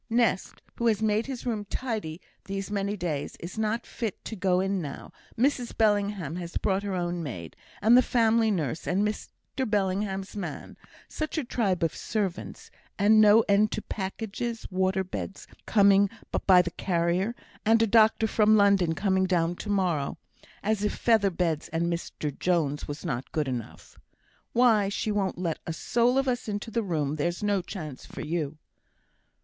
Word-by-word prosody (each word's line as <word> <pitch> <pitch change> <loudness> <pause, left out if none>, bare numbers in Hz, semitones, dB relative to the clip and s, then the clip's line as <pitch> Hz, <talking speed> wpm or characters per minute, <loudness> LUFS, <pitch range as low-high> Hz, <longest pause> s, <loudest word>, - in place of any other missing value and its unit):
Nest, 230 -5 0
who 235 - +1
has 215 -3 +3
made 215 +2 +1
his 260 -3 -6
room 220 -4 -1
tidy 210 -8 -4 0.3
these 195 0 -4
many 200 0 -1
days, 160 -6 -3
is 175 +6 -7
not 220 +2 -1
fit 225 -5 -5
to 225 - -5
go 185 -2 +2
in 195 0 0
now. 145 -4 -7 0.3
Mrs 250 0 0
Bellingham 205 -7 +1
has 175 -1 -4
brought 195 -2 0
her 200 -2 -3
own 175 -1 -2
maid, 90 - -6 0.3
and 225 +3 +7
the 250 - +8
family 230 -2 +3
nurse, 160 - -2
and 200 +4 +2
Mr 210 - -4 0.4
Bellingham's 195 -1 -1
man; 205 - -6 0.3
such 310 +1 -4
a 310 - 0
tribe 200 -8 0
of 165 - 0
servants 200 -5 -4 0.3
and 215 +2 +5
no 215 +1 +7
end 210 0 +3
to 215 - -3
packages; 225 +3 -4
water 190 +1 +1
beds 190 +1 -6 0.2
coming 200 -1 +5 0.4
by 180 -2 +7
the 175 - -4
carrier, 180 +6 0 0.3
and 225 +1 +4
a - - +5
doctor 220 +1 +4
from 215 0 +4
London 195 -5 +4
coming 190 0 +1
down 175 -2 +1
to 210 - -7
morrow, 180 -8 0 0.5
as 215 0 0
if 210 - 0
feather 220 -4 +3
beds 165 -4 -1
and 170 +1 -1
Mr 150 -3 -4
Jones 160 -5 0
was 145 +4 -6
not 130 -6 -3
good 155 -3 -1
enough. 125 -4 -6 0.5
Why, 225 -5 +4
she 210 +1 -2
won't 200 -2 -1
let 170 -3 -2
a 165 - -2
soul 240 +8 +1
of 270 0 +1
us 245 -2 -1
into 210 +2 -4
the 230 - 0
room; 155 -7 -1
there's 170 +6 -2
no 205 -2 +2
chance 155 -7 -7
for - - -8
you!" 155 -2 -3
195 Hz, 170 wpm, -27 LUFS, 175-220 Hz, 0.5 s, the